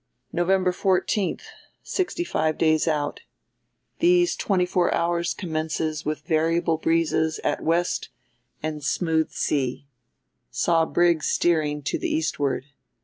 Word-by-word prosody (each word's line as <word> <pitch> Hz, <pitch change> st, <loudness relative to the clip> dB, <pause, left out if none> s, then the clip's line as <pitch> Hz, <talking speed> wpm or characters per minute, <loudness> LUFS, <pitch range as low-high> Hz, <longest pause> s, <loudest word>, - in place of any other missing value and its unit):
"November 185 Hz, +1 st, +2 dB
14, 190 Hz, +2 st, 0 dB, 0.5 s
65 345 Hz, -, -1 dB
days 155 Hz, 0 st, +2 dB
out. 150 Hz, -2 st, -1 dB, 0.8 s
These 350 Hz, +1 st, +4 dB
twenty 185 Hz, -3 st, +1 dB
four 180 Hz, 0 st, +1 dB
hours 170 Hz, 0 st, 0 dB
commences 155 Hz, -2 st, -2 dB
with 150 Hz, 0 st, -3 dB
variable 165 Hz, 0 st, +1 dB
breezes 160 Hz, -1 st, +1 dB
at -, -, 0 dB
west 170 Hz, +2 st, 0 dB, 0.5 s
and 155 Hz, -1 st, -4 dB
smooth 160 Hz, +1 st, +1 dB
sea. 135 Hz, -2 st, -1 dB, 0.6 s
Saw 165 Hz, -, +2 dB
brig 170 Hz, -2 st, +3 dB
steering 150 Hz, -3 st, +1 dB
to -, -, -2 dB
the -, -, -2 dB
Eastward. 145 Hz, -4 st, -1 dB
165 Hz, 110 wpm, -24 LUFS, 155-175 Hz, 0.8 s, These